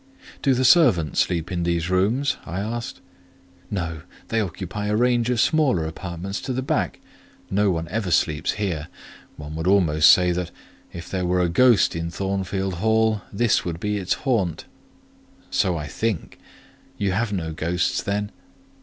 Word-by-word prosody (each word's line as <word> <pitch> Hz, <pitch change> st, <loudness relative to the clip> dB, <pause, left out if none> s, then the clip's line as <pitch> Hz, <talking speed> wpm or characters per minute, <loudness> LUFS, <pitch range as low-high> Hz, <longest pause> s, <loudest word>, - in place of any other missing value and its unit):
"Do 135 Hz, -3 st, +3 dB
the 130 Hz, +1 st, +1 dB
servants 120 Hz, -, +4 dB
sleep 85 Hz, 0 st, 0 dB
in 90 Hz, -1 st, -1 dB
these 85 Hz, 0 st, -1 dB
rooms?" 110 Hz, +10 st, +1 dB
I 85 Hz, +4 st, -5 dB
asked. 115 Hz, +3 st, -4 dB, 0.7 s
"No; 85 Hz, -5 st, -3 dB, 0.3 s
they 115 Hz, -1 st, +1 dB
occupy 100 Hz, +2 st, -4 dB
a 105 Hz, -, +1 dB
range 120 Hz, 0 st, +2 dB
of 125 Hz, -2 st, +1 dB
smaller 140 Hz, -, +2 dB
apartments 85 Hz, +4 st, -5 dB
to 130 Hz, -, -3 dB
the 130 Hz, +1 st, -2 dB
back; -, -, -1 dB, 0.5 s
no 100 Hz, +1 st, +2 dB
one 85 Hz, -2 st, -1 dB
ever 105 Hz, 0 st, -2 dB
sleeps 80 Hz, -2 st, +1 dB
here: 90 Hz, -8 st, -3 dB, 0.5 s
one 75 Hz, 0 st, -8 dB
would 80 Hz, +2 st, -3 dB
almost 85 Hz, -6 st, +5 dB
say 90 Hz, -1 st, +4 dB
that, 90 Hz, 0 st, -2 dB, 0.4 s
if 85 Hz, 0 st, -8 dB
there 90 Hz, -2 st, -2 dB
were 90 Hz, +1 st, +2 dB
a 90 Hz, -, +1 dB
ghost 120 Hz, +3 st, +4 dB
at 85 Hz, 0 st, -3 dB
Thornfield 95 Hz, +1 st, -2 dB
Hall, 110 Hz, -1 st, +2 dB
this 115 Hz, +2 st, +2 dB
would 85 Hz, -2 st, -4 dB
be 105 Hz, +2 st, -1 dB
its 95 Hz, -3 st, 0 dB
haunt." 100 Hz, -, 0 dB, 0.9 s
"So 90 Hz, -2 st, +1 dB
I 75 Hz, -, -4 dB
think: 105 Hz, +3 st, -3 dB, 0.6 s
you 100 Hz, -2 st, 0 dB
have 110 Hz, +3 st, -1 dB
no 80 Hz, -5 st, -3 dB
ghost, 85 Hz, +3 st, -1 dB
then?" 105 Hz, +1 st, -2 dB
95 Hz, 165 wpm, -23 LUFS, 85-110 Hz, 0.9 s, almost